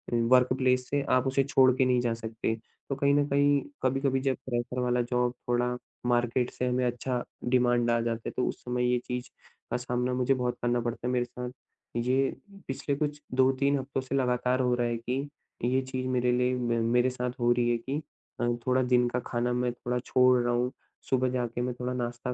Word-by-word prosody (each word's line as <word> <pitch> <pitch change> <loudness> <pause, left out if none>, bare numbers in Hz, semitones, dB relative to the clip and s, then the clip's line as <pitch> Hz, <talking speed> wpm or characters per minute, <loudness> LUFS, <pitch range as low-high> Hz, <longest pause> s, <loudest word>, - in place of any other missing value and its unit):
Work 125 +2 +4
place 125 -1 +2
से 145 0 +1
आप 130 +1 +3
उसे 135 +1 +2
छोड़ 130 -1 +5
के 130 - +4
नहीं 125 -1 +3
जा 120 -2 0
सकते। 115 0 -3 0.3
तो 135 - 0
कहीं 140 +1 +2
न 145 - +3
कहीं, 140 0 +3 0.2
कभी-कभी 135 +1 +1
जब 135 -1 +1
प्रेशर 125 0 -2
वाला 125 0 +1
जॉब 125 0 0 0.2
थोड़ा 125 0 +1 0.3
मार्केट 120 0 +1
से 125 - -2
हमें 125 0 +1
अच्छा 125 +1 -2 0.3
डिमांड 120 -1 +3
आ 120 - +3
जाता 115 -1 -2
है - - -2
तो 125 - +2
उस - - -4
समय 125 0 0
ये 125 - +3
चीज़ 125 0 -4 0.4
का - - +1
सामना 125 0 -1
मुझे 125 +1 +2
बहुत 125 -1 -1
करना 120 0 +1
पड़ता 120 +1 -3
है। - - 0
मेरे 125 -1 +1
साथ 125 0 -6 0.4
ये 130 +3 +2 0.4
पिछले 140 +1 -2
कुछ 150 0 -2
2-3 135 +2 +3
हफ्तों 135 0 -3
से 130 +1 -4
लगातार 125 0 +1
हो 125 -1 +2
रहा 120 -1 0
है 120 - -1
कि 130 +5 -3 0.3
ये 130 +2 +2
चीज़ 130 0 -3
मेरे 125 -1 +1
लिए 125 +1 +2
म 120 -2 0
मेरे 125 +1 +4
साथ 125 -1 -3
हो 120 0 +3
रही 120 0 +2
है 120 - +2
कि 135 +6 -4 0.4
अ, 120 - +2 0.2
थोड़ा 130 0 +3
दिन 125 -1 +3
का 125 - -1
खाना 120 0 0
मैं 125 0 0
थोड़ा 125 0 -2
छोड़ 125 0 +4
रहा 120 - +1
हूँ, 125 +1 0 0.4
सुबह 130 -1 +2
जाके 120 -1 -2
मैं 125 0 -1
थोड़ा 125 0 -2
नाश्ता 120 0 -3
125 Hz, 210 wpm, -28 LUFS, 120-130 Hz, 0.4 s, छोड़